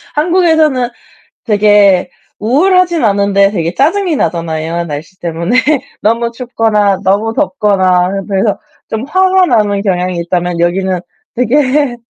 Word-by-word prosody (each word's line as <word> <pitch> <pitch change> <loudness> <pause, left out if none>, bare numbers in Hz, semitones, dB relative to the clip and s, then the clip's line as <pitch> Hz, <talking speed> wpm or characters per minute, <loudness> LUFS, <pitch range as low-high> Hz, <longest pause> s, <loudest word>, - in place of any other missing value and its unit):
한국에서는 315 -6 +2 0.6
되게 205 -4 +3 0.3
우울하진 345 - +2
않은데 200 -1 +2
되게 170 -4 -3
짜증이 345 +3 +1
나잖아요, 165 -3 -2
날씨 155 +5 -8
때문에. 170 +8 -1 0.4
너무 230 +2 0
춥거나 220 -5 0
너무 205 +4 +1
덥거나 195 -8 +1
그래서 200 +1 0 0.3
좀 220 +2 -4
화가 375 +3 +2
나는 205 - +1
경향이 180 -2 -1
있다면 175 0 -2
여기는 185 +1 0 0.4
되게 260 +2 +1
210 Hz, 285 characters per minute, -12 LUFS, 185-265 Hz, 0.6 s, 되게